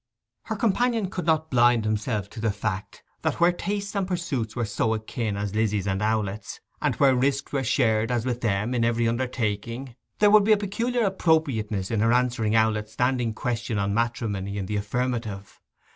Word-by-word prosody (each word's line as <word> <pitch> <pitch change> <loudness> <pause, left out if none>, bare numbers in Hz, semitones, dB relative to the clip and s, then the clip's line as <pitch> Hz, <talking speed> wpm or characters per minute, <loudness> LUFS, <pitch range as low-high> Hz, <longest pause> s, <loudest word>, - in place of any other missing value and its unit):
Her 220 - -3
companion 225 -1 +1
could 180 -3 -4
not 160 -1 +1
blind 120 -2 +4
himself 110 -1 -1
to 115 - -9
the 110 0 +1
fact 100 -1 -4 0.2
that - - 0
where 170 +1 +5
tastes 200 +3 -4
and 195 -2 0
pursuits 155 - -2
were 120 -2 -1
so 110 +1 0
akin 110 -1 -3
as 100 -1 -3
Lizzy's 105 -3 0
and 95 0 -1
Owlett's, 105 -1 -2 0.2
and - - +1
where 135 -2 +4
risks 135 +2 0
were 135 -1 0
shared, 115 -3 +2
as 120 -1 0
with 125 -1 -2
them, 105 +2 0
in 120 -2 +1
every 115 0 +2
undertaking, 115 0 -2 0.2
there 210 -1 +5
would 210 -1 +7
be 215 +2 +5
a - - +3
peculiar 230 +5 -1
appropriateness 140 - +1
in 115 - +1
her 115 +2 +3
answering 120 -3 +1
Owlett's 110 -1 +1
standing 125 -2 0
question 120 -2 -2
on 100 0 0
matrimony 105 -4 -1
in 100 - -2
the 105 - -3
affirmative. 110 -1 -3
115 Hz, 185 wpm, -25 LUFS, 105-140 Hz, 0.2 s, would